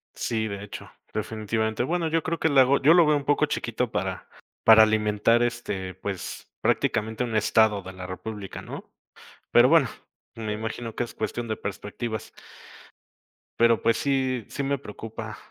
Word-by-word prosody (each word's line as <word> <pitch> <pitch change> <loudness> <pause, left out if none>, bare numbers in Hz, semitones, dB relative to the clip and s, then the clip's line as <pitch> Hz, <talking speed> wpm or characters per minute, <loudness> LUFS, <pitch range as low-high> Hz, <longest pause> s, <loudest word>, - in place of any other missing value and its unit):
Sí, 110 -2 -1
de 100 -1 -6
hecho, 105 - -9 0.2
definitivamente. 110 +1 -2
Bueno, 165 +4 0
yo 165 +1 +1
creo 170 +1 -2
que 160 - +2
le 140 -3 +6
hago 135 +2 +4
yo 150 +4 +7
lo 175 -1 +6
veo 150 0 +4
un 140 - -5
poco 145 +1 +3
chiquito 125 -5 -2
para 95 0 -3 0.4
para 110 0 +9
alimentar, 110 +2 +2
este, 105 -6 -3
pues, 95 -1 -6
prácticamente 110 +2 0
un 115 -2 -4
estado 110 -1 +3
de 95 - -9
la 90 -1 -8
república, 100 +2 -7
¿no? - - -9 0.6
Pero - - +7
bueno, - - +5 0.5
me 110 -2 -4
imagino 110 +1 -5
que - - 0
es 120 - -10
cuestión 120 0 -3
de 110 - -1
perspectivas. 105 +3 -5 1.3
Pero, 115 -1 +4
pues, 115 - +2
sí, 130 -4 0
sí 140 - -4
me 140 +1 0
preocupa 110 -2 -8
110 Hz, 165 wpm, -26 LUFS, 105-125 Hz, 1.3 s, para